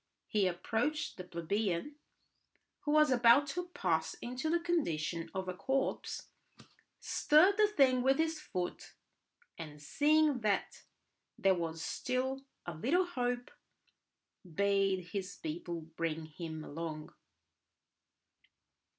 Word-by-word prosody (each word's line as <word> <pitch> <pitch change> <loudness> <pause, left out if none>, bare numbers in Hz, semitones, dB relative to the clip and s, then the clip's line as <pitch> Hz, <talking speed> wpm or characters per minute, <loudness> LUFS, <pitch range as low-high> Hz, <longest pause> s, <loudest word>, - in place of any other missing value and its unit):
He 205 -3 +2
approached 225 - -1
the 185 - -6
plebeian 180 - -2 0.9
who 295 - -2
was 305 -1 +5
about 245 +3 +6
to 355 +4 -3
pass 165 - -1
into 250 +5 -4
the 340 +2 +3
condition 170 - -1
of 190 -1 -2
a 185 - -2
corpse, 265 +9 -2 0.7
stirred 340 +7 +4
the 425 -1 +6
thing 270 -10 +4
with 270 +2 +3
his 320 0 0
foot, 180 -11 -5 0.6
and 150 -2 -8
seeing 295 - +3
that 210 -3 -1 0.5
there 195 0 +4
was 165 -2 -3
still 260 +1 -2 0.2
a 175 - -4
little 285 - +2
hope, 245 -6 -2 1.0
bade 195 -2 +2
his 200 -1 -4
people 165 +2 -5
bring 160 0 -4
him 160 0 -7
along. 155 0 -6
205 Hz, 115 wpm, -33 LUFS, -, 1.0 s, about